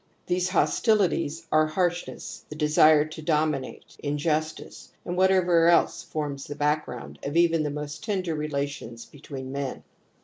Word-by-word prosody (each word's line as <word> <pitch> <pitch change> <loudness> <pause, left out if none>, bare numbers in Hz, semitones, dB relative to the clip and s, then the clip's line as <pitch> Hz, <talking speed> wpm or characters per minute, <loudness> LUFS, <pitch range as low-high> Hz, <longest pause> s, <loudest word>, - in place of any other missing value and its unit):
These 180 +1 0
hostilities 175 -6 +1
are 155 0 +4
harshness, 175 +2 -2
the 150 - -7
desire 155 0 +5
to 155 0 -9
dominate, 150 -3 -1
injustice, 150 +2 -3
and 175 - -3
whatever 180 -3 +4
else 170 0 +3
forms 145 -3 -4
the 145 - -7
background 150 +1 -2
of 145 +4 -3
even 165 -1 +4
the 150 - -1
most 150 0 -6
tender 190 -6 -1
relations 140 -6 -4
between 135 -2 -9
men. 140 -1 -4
155 Hz, 135 wpm, -26 LUFS, 145-170 Hz, -, desire